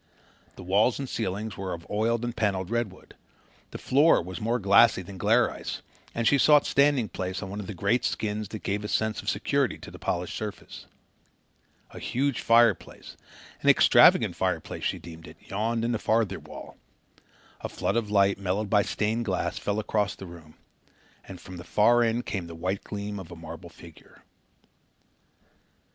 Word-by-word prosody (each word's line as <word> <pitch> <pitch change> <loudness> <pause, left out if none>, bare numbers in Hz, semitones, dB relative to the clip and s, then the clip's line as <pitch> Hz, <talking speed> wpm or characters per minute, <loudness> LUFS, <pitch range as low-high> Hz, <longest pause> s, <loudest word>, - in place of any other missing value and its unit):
The - - -10
walls 100 +6 +2
and 140 - -4
ceiling 110 -1 -3
were 95 -1 -4
of 85 0 -13
oiled 115 +3 0
and 120 - -4
panelled 100 -3 -1
redwood. 115 -6 -4 0.6
The - - -7
floor 145 +5 +4
was 90 +3 -7
more 115 +3 0
glassy 100 -1 +5
than 95 +1 -10
glare 115 +5 +3
ice, - - -6 0.3
and 115 -1 0
she 140 - +4
sought 150 +2 +5
standing 140 -4 +3
place 95 +1 -4
on 95 - -7
one 100 - -5
of 100 - -6
the 105 - -6
great 120 +7 +1
skins 105 -1 -2
that 110 +2 -8
gave 105 +1 -2
a - - -3
sense 110 +1 -1
of - - -3
security - - 0
to - - -11
the - - -12
polished 90 0 -3
surface. 105 -2 -7 1.0
A - - -9
huge 135 +1 -1
fireplace 115 -3 +2 0.5
an - - +3
extravagant - - +6
fireplace, - - -2
she - - 0
deemed 80 0 -11
it - - -13
yawned 115 +3 -2
in 120 - 0
the 115 - -1
farther 110 -3 0
wall. - - -11 0.8
A - - -5
flood - - -2
of 115 -3 -1
light, 100 -1 +3
mellowed 100 +2 -2
by 105 -2 +5
stained 110 +3 -1
glass, 95 0 -2
fell 105 0 -2
across 105 -2 -1
the 95 - -10
room, 85 -3 -13 0.7
and 95 -2 -9
from 90 -1 -10
the 85 - -8
far 115 +6 +3
end 115 +1 0
came 95 -4 -4
the 85 - -9
white 95 +4 -3
gleam 105 0 -5
of 90 -2 -10
a - - -8
marble 85 +1 -10
figure. 85 -1 -16
105 Hz, 180 wpm, -27 LUFS, 95-115 Hz, 1.0 s, extravagant